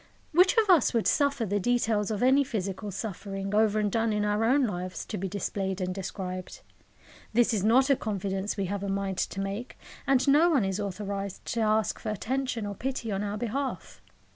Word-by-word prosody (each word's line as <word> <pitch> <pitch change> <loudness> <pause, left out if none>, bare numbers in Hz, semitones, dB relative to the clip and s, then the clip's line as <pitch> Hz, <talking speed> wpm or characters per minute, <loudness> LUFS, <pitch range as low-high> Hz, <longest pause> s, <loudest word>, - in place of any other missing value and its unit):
Which 365 +7 +5
of 445 -2 +4
us 340 - +4
would 230 - +2
suffer 280 -5 +2
the 205 0 0
details 225 -2 +1
of 215 +1 -1
any 265 +3 +5
physical 205 -5 -4
suffering, 195 0 -5
over 215 0 +3
and 210 -1 0
done 225 +1 +1
in 210 0 0
our 210 +1 +1
own 265 +3 +4
lives, 185 -3 -4
to - - -5
be 190 +1 -3
displayed 195 0 -3
and 185 -1 -2
described? 185 -1 -6 0.7
This 240 +1 +3
is 200 -3 0
not 260 +6 +4
a - - +6
confidence 200 -3 -3
we 200 - 0
have 200 +1 -3
a 200 - -3
mind 195 -1 -2
to 195 - -2
make; 200 +5 -4 0.3
and 270 0 +3
no 300 +5 +6
one 275 - +3
is 195 +1 -2
authorised 200 -1 -4
to 235 - -1
ask 215 0 +1
for 220 - -4
attention 240 +1 -2
or 205 - -4
pity 240 0 -3
on 195 0 -1
our 205 0 -3
behalf. 255 +5 -4
210 Hz, 200 wpm, -28 LUFS, 195-245 Hz, 0.7 s, a